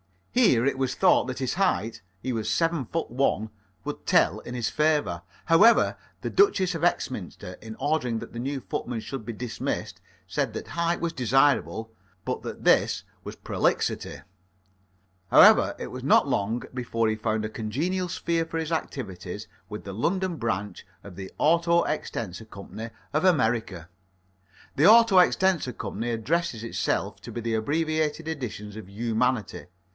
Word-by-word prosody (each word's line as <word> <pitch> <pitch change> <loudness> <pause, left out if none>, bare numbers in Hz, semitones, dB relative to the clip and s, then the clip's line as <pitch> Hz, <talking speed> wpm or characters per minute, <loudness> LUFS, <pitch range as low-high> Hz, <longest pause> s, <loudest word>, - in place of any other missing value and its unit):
Here 190 - +4
it 140 -1 +1
was 130 -1 0
thought - - +4
that 130 0 -5
his 130 +3 -1
height 175 - 0 0.2
he 130 - -1
was 110 -1 -2
seven 165 -3 +1
foot 165 +3 -3
one 115 -4 0 0.3
would - - -6
tell - - +3
in 125 - -8
his 120 -2 -1
favour. 150 - +1 0.2
However, 200 +8 +5 0.3
the - - -3
Duchess 385 - +3
of - - -5
Exminster, - - -2
in 110 0 -8
ordering 135 -4 0
that 115 - -10
the 120 - -5
new 135 +2 -3
footman 115 -1 -4
should 115 +1 -6
be 115 - -4
dismissed, 115 +1 -4 0.3
said - - -1
that - - -6
height 170 0 -1
was 170 -1 -1
desirable, 130 -3 +2 0.3
but - - -2
that - - -7
this - - +3 0.2
was - - -6
prolixity. - - -1 1.1
However, - - +7
it - - -5
was - - -7
not - - +4
long 110 +4 -1
before 115 -3 -1
he 110 - 0
found 110 0 -1
a - - -3
congenial 155 - -2
sphere 170 -1 -1
for 165 0 -5
his 160 0 -3
activities 105 - -4 0.2
with 105 0 -7
the 100 - -7
London 180 - -1
branch 105 -5 -3 0.2
of 100 -3 -11
the 95 0 -8
Auto 170 +2 +3
extensor 115 - -4
Co. 100 -2 -11 0.5
of 155 +5 +1
America. 110 - +1 0.9
The 150 - +6
Auto 225 -3 +7
extensor 180 -6 +3
Co. 105 -3 -6
addresses 120 +2 -1
itself 115 - -2
to 120 - -9
the 115 0 -3
abbreviated 155 +6 0
editions 110 -9 -5
of 110 -3 -9
humanity. 115 +2 -1
125 Hz, 155 wpm, -26 LUFS, 110-165 Hz, 1.1 s, However